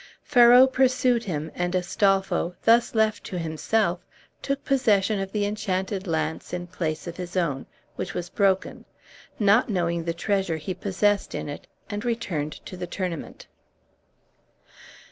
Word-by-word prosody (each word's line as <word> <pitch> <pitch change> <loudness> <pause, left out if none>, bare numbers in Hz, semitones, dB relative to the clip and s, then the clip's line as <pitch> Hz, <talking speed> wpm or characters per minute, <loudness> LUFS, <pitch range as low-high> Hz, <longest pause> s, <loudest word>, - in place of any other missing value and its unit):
Ferrau 245 -2 +7
pursued 255 -2 +2
him, 155 -4 -3
and 175 +1 -2
Astolpho, 185 -1 +1
thus 230 +1 +4
left 220 -1 +2
to 185 - -5
himself, 170 +3 0 0.4
took 275 0 -3
possession 215 -7 +2
of 195 0 -4
the 205 -1 0
enchanted 195 -1 -2
lance 160 0 -2
in 175 0 -3
place 165 -3 -4
of 170 -1 -7
his 180 0 -5
own, 145 -7 -1 0.3
which - - -4
was 175 -1 -3
broken, 190 0 0 0.5
not 210 +4 +4
knowing 170 -4 0
the 170 - -1
treasure 190 -2 0
he 160 +4 -4
possessed 200 +2 0
in - - -4
it, 145 - -8 0.2
and 205 0 -4
returned 185 -11 -2
to - - -8
the 180 -1 -5
tournament. 180 -3 -5
190 Hz, 145 wpm, -25 LUFS, 175-215 Hz, 0.5 s, Ferrau